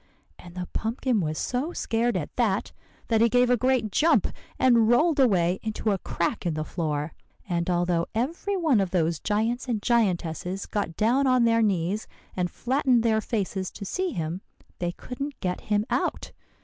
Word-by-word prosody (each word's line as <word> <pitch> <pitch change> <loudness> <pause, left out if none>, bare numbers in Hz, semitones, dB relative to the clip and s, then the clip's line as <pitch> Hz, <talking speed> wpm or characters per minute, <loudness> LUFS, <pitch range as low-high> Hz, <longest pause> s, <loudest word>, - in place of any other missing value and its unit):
And 175 0 -13
the 180 -1 -4
pumpkin 230 0 0
was 155 -2 -2
so 265 - -2
scared 230 -2 0
at 150 - -5
that, 215 -6 0 0.4
that 225 -1 +3
he 230 - +5
gave 245 +1 +3
a - - +6
great 250 -3 +1
jump, 320 - +3 0.3
and 235 -3 +4
rolled 300 +5 +3
away 185 -8 +3
into 220 0 -1
a 195 - 0
crack 170 +5 -2
in 170 -4 -1
the 155 - -2
floor; 155 -2 -3 0.3
and 170 -1 -1
although 175 -1 +1
every 335 - -1
one 305 - +3
of 190 - -1
those 170 -3 0
giants 225 +5 -1
and 235 -4 0
giantesses 190 - 0
got 200 -6 -3
down 255 +6 +3
on 255 -2 +4
their 230 0 +3
knees 195 0 0 0.3
and 180 -1 0
flattened 255 0 +1
their 220 -2 +2
faces 195 -4 -2
to 200 - -7
see 370 - -1
him, 170 - -4 0.4
they 175 -1 -1
couldn't 275 +7 -6
get 180 -2 -2
him 210 0 0
out. - - -1
215 Hz, 175 wpm, -26 LUFS, 180-245 Hz, 0.4 s, a